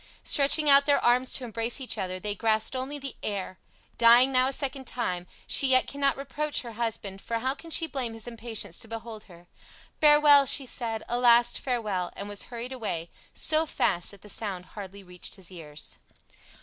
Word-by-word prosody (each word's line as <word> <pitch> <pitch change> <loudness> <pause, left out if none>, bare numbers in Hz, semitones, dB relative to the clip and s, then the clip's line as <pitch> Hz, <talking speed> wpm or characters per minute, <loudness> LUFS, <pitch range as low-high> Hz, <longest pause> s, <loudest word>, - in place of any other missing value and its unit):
Stretching 295 +1 +2
out 280 0 +7
their 285 - +4
arms 250 +2 +3
to 260 - -2
embrace 230 +2 -1
each 260 - -2
other, 185 -3 -4
they 205 +2 -3
grasped 220 +3 0
only 265 +3 -4
the 275 -2 -6
air! 195 -2 -5 0.4
Dying 240 +3 +6
now 255 0 +3
a - - -1
second 270 -1 -2
time, 180 -8 -3 0.2
she 275 - +4
yet 255 -1 +5
cannot 280 -1 -1
reproach 290 +2 -3
her 235 - -8
husband, 220 -4 -4
for 230 - -3
how 260 +3 -1
can 330 +3 -13
she 325 +1 +2
blame 260 -7 -4
his 225 - -3
impatience 225 -6 -3
to - - -6
behold 225 -1 -8
her? 175 -2 -17 0.5
"Farewell," 295 -2 +6
she 270 - +3
said, 225 -3 -1
"a 240 - -2
last 240 -1 +4
farewell," 215 -9 -3
and 200 - -7
was 205 -1 -5
hurried 245 +1 -6
away, 175 -9 -4 0.2
so 315 +1 +2
fast 175 -10 +1
that 200 -2 -9
the - - -12
sound 195 -4 -3
hardly 200 -1 -9
reached 180 -1 -6
his 190 -2 -8
ears. 155 -4 -7
235 Hz, 190 wpm, -27 LUFS, 205-270 Hz, 0.5 s, out